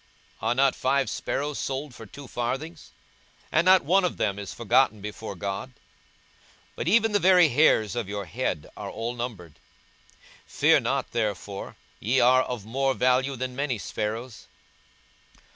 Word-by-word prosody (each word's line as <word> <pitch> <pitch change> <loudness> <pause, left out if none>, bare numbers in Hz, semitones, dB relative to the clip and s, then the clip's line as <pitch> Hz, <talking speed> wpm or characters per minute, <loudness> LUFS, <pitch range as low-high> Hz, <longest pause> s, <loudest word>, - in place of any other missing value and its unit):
42:012:006 110 - -2
Are - - +1
not 135 0 +3
five 135 +1 +1
sparrows 145 +1 -3
sold 135 0 -4
for 110 -1 -11
two 140 +6 -11
farthings, 135 +8 -4 0.6
and 165 +2 +3
not 185 -3 +6
one 190 +5 +4
of 180 - -1
them 100 -1 -1
is 100 - -6
forgotten 120 0 +2
before 105 0 -7
God? 100 +6 -4
42:012:007 130 - -28 1.0
But - - -3
even 225 +3 +4
the 205 - +3
very 180 -4 +6
hairs 120 -6 +3
of 120 -5 -3
your 100 -1 -4
head 90 -5 -3
are - - -6
all 115 +2 -4
numbered. 110 -10 -7 0.9
Fear - - +4
not - - -2
therefore: 105 -3 -3 0.2
ye 125 +5 +1
are 130 +1 +5
of 125 -5 -5
more 135 +4 0
value 130 +2 +2
than 125 0 -4
many 140 -3 -1
sparrows. 105 0 -5
125 Hz, 160 wpm, -26 LUFS, 110-140 Hz, 1.0 s, not